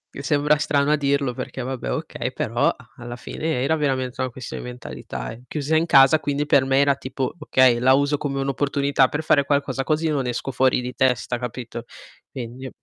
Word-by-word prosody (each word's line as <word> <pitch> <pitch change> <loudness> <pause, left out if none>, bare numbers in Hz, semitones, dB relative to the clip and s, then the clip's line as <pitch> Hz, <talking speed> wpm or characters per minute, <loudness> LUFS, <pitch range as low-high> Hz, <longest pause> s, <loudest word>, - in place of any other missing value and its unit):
Mi 140 - -5
sembra 150 +1 +2
strano 145 0 +1
a - - +5
dirlo 140 -3 0
perché 130 +1 -6
vabbè, 130 - -4
okay, - - -4
però - - +1 0.3
alla 120 0 -7
fine 130 +1 -3
era 160 +3 +2
veramente 130 -4 -1
una 130 - -1
questione 125 +1 -7
di 125 - -7
mentalità 125 -2 -7
eh, 115 +2 -11
chiusa 150 +2 -1
in 165 +2 +2
casa 135 +3 +6
quindi 145 0 -1
per 140 -2 +4
me 135 0 +2
era 140 0 +4
tipo 130 0 -4
okay, 130 -5 +4
la 130 +2 +5
uso 140 +1 +1
come 140 -2 -2
un'opportunità 140 0 +1
per 150 +3 -4
fare 140 -2 +3
qualcosa 140 -2 0
così 155 +2 0
non 135 -4 -1
esco 125 +2 -3
fuori 130 0 +2
di 125 +1 -5
testa, 125 -1 0
capito? 120 -1 -6 0.4
Quindi 130 +1 -7
135 Hz, 195 wpm, -23 LUFS, 125-145 Hz, 0.4 s, casa